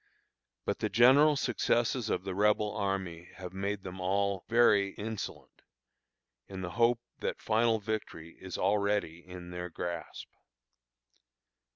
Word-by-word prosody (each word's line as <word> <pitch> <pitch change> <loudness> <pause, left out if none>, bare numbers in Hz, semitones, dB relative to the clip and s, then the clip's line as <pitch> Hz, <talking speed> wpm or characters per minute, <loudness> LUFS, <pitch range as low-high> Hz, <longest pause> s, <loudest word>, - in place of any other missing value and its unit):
But - - -1
the - - -1
general 140 +6 +6
successes 120 -2 0
of - - -1
the 95 -1 -4
Rebel 105 +1 +2
army 95 -4 -3
have 90 -1 -8
made 100 +1 -3
them 95 0 -7
all 100 0 0
very 105 -4 +4
insolent, 110 0 -6 0.9
in 95 -1 -7
the 90 -1 -4
hope 120 +3 +2 0.2
that - - -3
final 115 +1 +2
victory 100 -6 -5
is 95 -1 -6
already 100 -4 +1
in 90 -1 -10
their 90 0 -5
grasp. 85 0 -6
100 Hz, 130 wpm, -31 LUFS, 90-110 Hz, 0.9 s, general